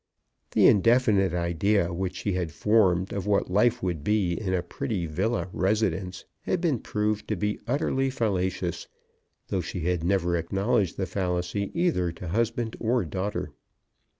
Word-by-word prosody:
The - - +5
indefinite 105 -3 +4
idea 85 +2 +1
which 95 +1 -3
she 95 +1 -2
had 90 -3 -2
formed 95 -1 +2
of 100 0 -3
what 100 -2 +1
life 120 +5 +2
would 85 -6 -2
be 100 -2 +1
in 95 +1 -3
a 90 -2 0
pretty 110 -11 -3
villa 90 +3 -1
residence 95 -2 -1
had 185 - -1
been 160 -8 +1
proved 105 0 -2
to 110 - -1
be 105 +3 -2
utterly 135 0 +1
fallacious, 95 -7 -1 0.6
though 95 - 0
she 85 +2 -5
had 90 0 0
never 90 -1 +1
acknowledged 95 +4 0
the 95 - -1
fallacy 90 +1 -2
either 125 - +1
to 90 0 -7
husband 115 +3 -1
or 120 -2 +1
daughter. 95 +5 -3
95 Hz, 150 wpm, -26 LUFS, 90-110 Hz, 0.6 s, The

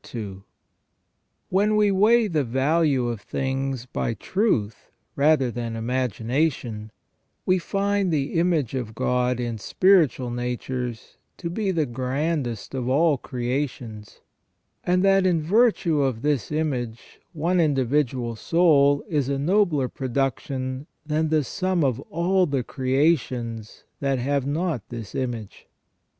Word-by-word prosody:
* - - -49
When 205 +3 +3
we 210 -1 +4
weigh 220 +4 +4
the 155 -6 0
value 135 +1 +1
of 115 -3 -3
things 135 -2 -3
by 115 -2 -2
truth 110 - -1 0.3
rather 140 -3 +3
than 115 0 -4
imagination, 120 -1 -1 0.6
we 185 0 +3
find 200 +1 0
the 145 -3 -1
image 165 -8 +1
of 120 -4 -4
God 125 0 0
in 120 -2 -3
spiritual 155 - +3
natures 125 -1 -4 0.2
to 170 -2 -5
be 200 +2 -1
the 165 -5 +1
grandest 130 0 -2
of 130 -2 -2
all 145 +1 +3
creations, 120 -4 -4 0.6
and 180 +1 +2
that 195 -1 +4
in 175 -3 +2
virtue 185 -5 +3
of 130 -4 -1
this 145 -3 0
image 130 -7 -3
one 170 +3 0
individual 130 -5 +1
soul 145 0 +3
is 145 -8 0
a 140 - 0
nobler 160 -3 +2
production 130 +1 -3 0.2
than 155 +1 0
the 155 -1 +2
sum 185 +3 -1
of 130 -3 +1
all 180 +2 +2
the 140 -4 -1
creations 130 -5 -1 0.2
that 135 -1 0
have 140 +2 -1
not 155 -3 -1
this 115 -4 -7
image. 120 -5 -5
140 Hz, 125 wpm, -24 LUFS, 125-165 Hz, 0.6 s, we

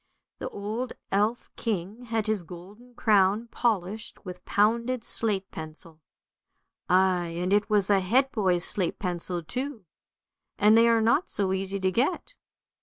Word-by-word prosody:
The - - -4
old 220 +5 -4 0.2
elf 210 +4 0
king 215 +2 -3
had 225 -2 -1
his 215 -3 0
golden 195 +9 -13
crown 210 +1 +3
polished 215 -1 -2
with 180 -1 -8
pounded 235 +4 +1
slate 200 -5 -2
pencil, 160 0 -8 0.9
ay, 185 -1 +3
and 180 +2 0
it 205 0 +2
was 205 -2 +2
a 200 -1 +4
head 255 +9 +2
boy's 185 -6 +2
slate 185 -4 0
pencil 175 -1 -3
too, 255 - -4 0.7
and 210 +2 +5
they 230 +1 +6
are 230 -1 +4
not 235 - +2
so 190 -2 -1
easy 195 +1 -2
to 190 0 +2
get. 270 - -1
205 Hz, 145 wpm, -27 LUFS, 185-230 Hz, 0.9 s, they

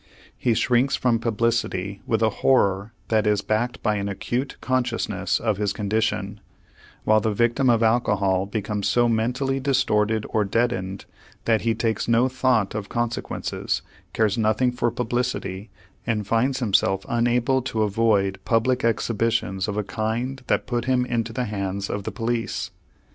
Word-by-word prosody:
He 120 -3 +1
shrinks 125 +4 +2
from 120 -2 +1
publicity 115 -4 -1
with 110 -1 +1
a 110 - +3
horror 100 -5 +3 0.2
that 110 -1 +2
is 105 -1 +2
backed 120 +3 -1
by 105 -2 +1
an 100 0 -2
acute 125 +6 -3
consciousness 130 -1 -1
of 110 -3 0
his 100 -1 0
condition, 105 -1 -1 0.6
while 110 0 +4
the 110 +1 0
victim 120 +4 +2
of 115 -1 +3
alcohol 100 -5 +2
becomes 105 -1 -2
so 120 +3 +3
mentally 125 +4 0
distorted 110 -5 +1
or 110 - +1
deadened 100 -3 -1 0.4
that 110 -2 +3
he 115 -1 +1
takes 115 0 -1
no 120 +2 +4
thought 125 -5 +1
of 105 -1 -5
consequences, 120 -1 -2 0.3
cares 110 0 +1
nothing 110 +3 +2
for 120 -1 0
publicity, 120 -4 -2 0.4
and 110 -3 0
finds 130 +5 +1
himself 95 -3 +2
unable 120 +2 +2
to 115 -3 -1
avoid 100 -2 +1
public 125 +2 +1
exhibitions 115 -3 0
of 105 -1 -3
a 105 - 0
kind 115 +6 -3
that - - +1
put 120 -2 -2
him 130 -1 +2
into 115 -2 -2
the 125 +1 -2
hands 100 -2 -3
of 100 -1 -4
the - - -3
police. 115 0 -2
115 Hz, 155 wpm, -24 LUFS, 105-120 Hz, 0.6 s, while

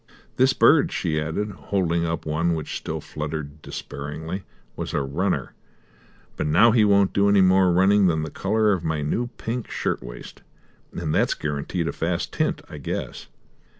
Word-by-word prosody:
"This 130 +1 +5
bird," 145 +1 +5
she 80 -4 -1
added, 80 +7 -2
holding 85 -4 -1
up 80 -1 -3
one 80 +2 0
which 80 -2 -5
still - - -4
fluttered 75 -1 -6
despairingly, 75 +8 -6 0.3
"was - - -4
a - - +1
runner, 90 +8 -1 0.8
but - - -2
now 100 +10 +6
he 110 -1 +4
won't 100 -2 +4
do 100 0 +3
any 100 -1 +5
more 95 0 +5
running 95 +2 +4
than 80 -2 +1
the 80 - -5
colour 105 +1 +1
of 90 -3 -2
my 80 -2 -1
new 115 +11 -1
pink 120 +1 -4
shirt - - -2
waist; - - -10 0.5
and 80 -3 -3
that's - - +2
guaranteed 75 +3 -3
a - - -2
fast 85 +1 -2
tint, - - -1
I 75 - -9
guess." 70 - -5
85 Hz, 170 wpm, -24 LUFS, 75-100 Hz, 0.8 s, now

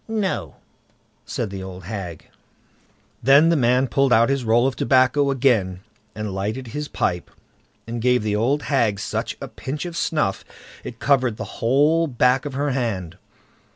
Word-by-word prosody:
"No", 190 - -2 0.7
said 110 -5 -3
the 95 -1 -6
old 95 -1 -8
hag. 90 -4 -7 0.9
Then 140 +6 +6
the 170 - +3
man 125 -1 +3
pulled 135 +2 +1
out 115 +1 +5
his 135 -2 0
roll 115 +2 +3
of 135 -1 0
tobacco 130 +3 +3
again, 115 -9 +1 0.3
and 105 -2 -4
lighted 110 +6 -4
his 150 +4 -4
pipe, 90 -9 -2 0.6
and 115 0 -5
gave 125 -1 +2
the 105 -1 0
old 130 +7 +1
hag 115 -8 +1
such - - -3
a - - -6
pinch 145 +6 -6
of 175 -1 -6
snuff 150 -12 -1 0.4
it 115 - -8
covered 130 -4 +1
the 110 -3 -8
whole 150 +7 +3
back 125 +1 +2
of 145 - -5
her 145 +1 0
hand. 110 -10 -3
125 Hz, 160 wpm, -22 LUFS, 105-140 Hz, 0.9 s, Then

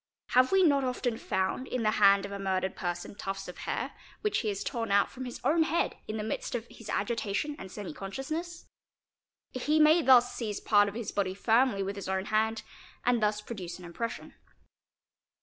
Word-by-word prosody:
Have 255 +1 +4
we 385 -1 +5
not 285 -5 +4
often 250 -2 -1
found 190 +7 -1
in 250 -2 -2
the 215 - +3
hand 200 0 +6
of 200 - -7
a 200 - -5
murdered 190 -1 -1
person 175 +1 -4
tufts 195 -1 -5
of 180 - -8
hau, - - -3 0.3
which 425 - +1
he 220 - -2
has 200 -1 -2
torn 230 -2 -3
out 200 0 +3
from 260 0 -7
his 245 - -7
own 310 +6 +3
head 320 +1 +1
in 215 - -3
the 210 - -3
midst 220 - -3
of 230 -1 -3
his 225 - -11
agitation 235 +5 -1
and 190 - -8
semi 200 -5 -6
consciousness. 310 - -5 0.9
He 295 +5 +1
may 310 +2 +6
thus 250 -3 +6
seize 215 -4 -3
part 205 -1 +4
of 200 - -10
his 230 -3 -4
body 190 -2 -1
firmly 225 -1 +3
with 195 +1 -3
his 195 - -5
own 190 0 -1
hand 220 +1 0 0.4
and 245 -2 +3
thus 210 0 +1
produce 185 -6 -7
an 180 - -11
impression. 230 +7 -5
220 Hz, 200 wpm, -30 LUFS, 195-255 Hz, 0.9 s, hand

